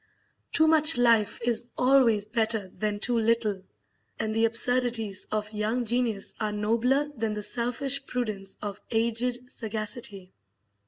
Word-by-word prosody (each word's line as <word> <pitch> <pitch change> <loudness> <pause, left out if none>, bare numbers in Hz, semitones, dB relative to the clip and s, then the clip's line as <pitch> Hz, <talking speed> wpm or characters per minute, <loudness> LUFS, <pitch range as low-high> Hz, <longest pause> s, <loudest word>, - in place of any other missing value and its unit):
Too 315 - +3
much 315 -2 +5
life 230 -3 +3
is 240 0 -1
always 250 -5 +3
better 220 -3 -1
than 210 +2 -3
too 235 +2 0
little, 220 -3 0 0.6
and 220 -1 -2
the 225 +1 +2
absurdities 230 -3 0
of 215 0 -3
young 220 +4 -1
genius 230 -3 0
are 215 -1 -1
nobler 235 +7 0
than 225 -2 -2
the 210 - -5
selfish 250 +5 +2
prudence 210 -6 -3
of 205 -1 -6
aged 240 +2 -1
sagacity. 215 -3 -3
225 Hz, 130 wpm, -27 LUFS, 210-245 Hz, 0.6 s, much